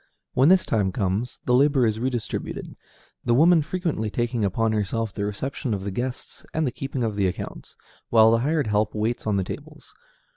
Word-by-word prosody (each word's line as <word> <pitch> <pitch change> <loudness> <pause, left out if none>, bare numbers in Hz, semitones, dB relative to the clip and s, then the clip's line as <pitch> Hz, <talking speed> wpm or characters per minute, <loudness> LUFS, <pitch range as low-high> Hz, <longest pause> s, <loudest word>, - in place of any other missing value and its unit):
When 135 +5 +5
this 185 0 +5
time 100 -4 +1
comes, 100 +6 -2
the 125 - +2
labor 135 0 +4
is 110 -1 0
redistributed, 120 -2 -3 0.5
the 120 -1 +2
woman 165 +4 +6
frequently 155 - -2
taking 120 0 -1
upon 110 +3 +1
herself 110 0 -1
the 100 - -2
reception 115 +3 -3
of 95 - -5
the 100 - -3
guests 125 +5 -5
and 160 0 +1
the 130 - 0
keeping 135 0 -4
of 110 -3 -1
the 100 -2 +2
accounts, 90 - -6 0.3
while 110 -1 +6
the 115 - +3
hired 150 +3 +1
help 105 0 0
waits 110 +2 -1
on 105 - +2
the 95 - +1
tables. - - -9
115 Hz, 190 wpm, -24 LUFS, 105-135 Hz, 0.5 s, woman